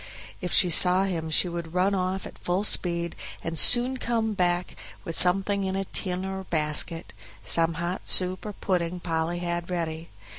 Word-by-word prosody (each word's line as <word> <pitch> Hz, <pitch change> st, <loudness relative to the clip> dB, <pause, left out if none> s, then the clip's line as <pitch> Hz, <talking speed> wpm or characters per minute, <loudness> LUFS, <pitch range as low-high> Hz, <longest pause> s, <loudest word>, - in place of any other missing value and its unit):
If 180 Hz, -2 st, -4 dB
she 180 Hz, -, +6 dB
saw 180 Hz, +3 st, +5 dB
him 170 Hz, -5 st, -3 dB
she 160 Hz, +3 st, +4 dB
would 170 Hz, -1 st, -7 dB
run 190 Hz, +2 st, +1 dB
off 190 Hz, 0 st, -2 dB
at -, -, -12 dB
full 180 Hz, +3 st, -2 dB
speed 170 Hz, -4 st, +1 dB, 0.3 s
and 165 Hz, 0 st, -4 dB
soon 245 Hz, +8 st, +3 dB
come 230 Hz, -3 st, -2 dB
back 175 Hz, -2 st, -1 dB, 0.3 s
with 165 Hz, -, -6 dB
something 195 Hz, +2 st, +3 dB
in 190 Hz, 0 st, -3 dB
a 195 Hz, 0 st, -2 dB
tin 185 Hz, 0 st, -3 dB
or 190 Hz, 0 st, -6 dB
basket, 160 Hz, +1 st, -2 dB, 0.3 s
some 165 Hz, 0 st, +2 dB
hot 170 Hz, +3 st, -5 dB
soup 185 Hz, +2 st, +2 dB
or 210 Hz, -, -6 dB
pudding 180 Hz, -2 st, -2 dB
Polly 165 Hz, 0 st, -3 dB
had 175 Hz, 0 st, -4 dB
ready. 165 Hz, -2 st, -4 dB
180 Hz, 175 wpm, -25 LUFS, 170-190 Hz, 0.3 s, she